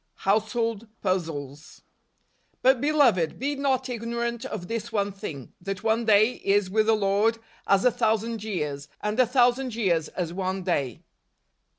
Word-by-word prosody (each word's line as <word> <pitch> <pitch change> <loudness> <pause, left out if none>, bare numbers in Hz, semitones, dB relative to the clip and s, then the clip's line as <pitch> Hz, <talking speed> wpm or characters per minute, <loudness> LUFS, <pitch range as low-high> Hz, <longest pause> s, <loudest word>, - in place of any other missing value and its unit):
Household 220 +2 0 0.2
Puzzles. 155 -6 -3 0.4
' - - -43
But, 260 -1 +4
beloved, 255 - +3
be 280 +3 -1
not 270 -2 0
ignorant 235 0 -3
of 205 -8 -5
this 230 +1 -4
one 205 -2 0
thing, 150 -9 -8
that 195 +2 -5
one 225 +1 +1
day 215 +3 +4
is 195 -1 +2
with 215 +1 +2
the 225 - +5
Lord 210 +2 +2 0.3
as 195 +2 +3
a 250 - +6
thousand 225 -1 0
years, 150 -9 -3
and 210 +3 -2
a 255 - +5
thousand 250 0 +2
years 175 -8 +1
as 170 -2 -4
one 190 0 -2
day." 140 - -1
215 Hz, 155 wpm, -26 LUFS, 185-235 Hz, 0.4 s, a